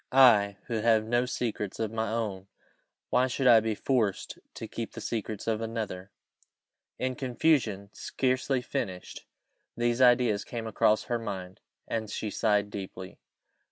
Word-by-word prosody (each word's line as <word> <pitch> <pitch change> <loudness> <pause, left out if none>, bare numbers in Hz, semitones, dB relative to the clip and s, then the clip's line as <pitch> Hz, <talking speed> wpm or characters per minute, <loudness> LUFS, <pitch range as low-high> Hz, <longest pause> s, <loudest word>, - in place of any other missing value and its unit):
I, 110 -7 +6
who 115 -2 -2
have 110 -1 +3
no 120 +2 +1
secrets 105 -5 -3
of 110 -2 -1
my 110 -1 -2
own 105 -4 -3 0.6
why 125 +1 +3
should 130 +1 -2
I 120 -3 +8
be 110 -1 -1
forced 110 -5 -1 0.2
to - - -6
keep - - -6
the - - -7
secrets 110 -2 -4
of 110 -1 0
another?" 110 -4 -4 0.9
In 130 0 -1
confusion, 120 -6 0
scarcely 130 0 -1
finished, 90 -6 -5 0.5
these 120 +1 +1
ideas 120 -4 +4
came 115 -2 -6
across 110 0 +2
her 120 -1 -2
mind, 95 -4 -6 0.3
and 110 -2 -3
she 105 0 -4
sighed 105 -2 +1
deeply. 95 -2 -7
110 Hz, 145 wpm, -29 LUFS, 105-120 Hz, 0.9 s, I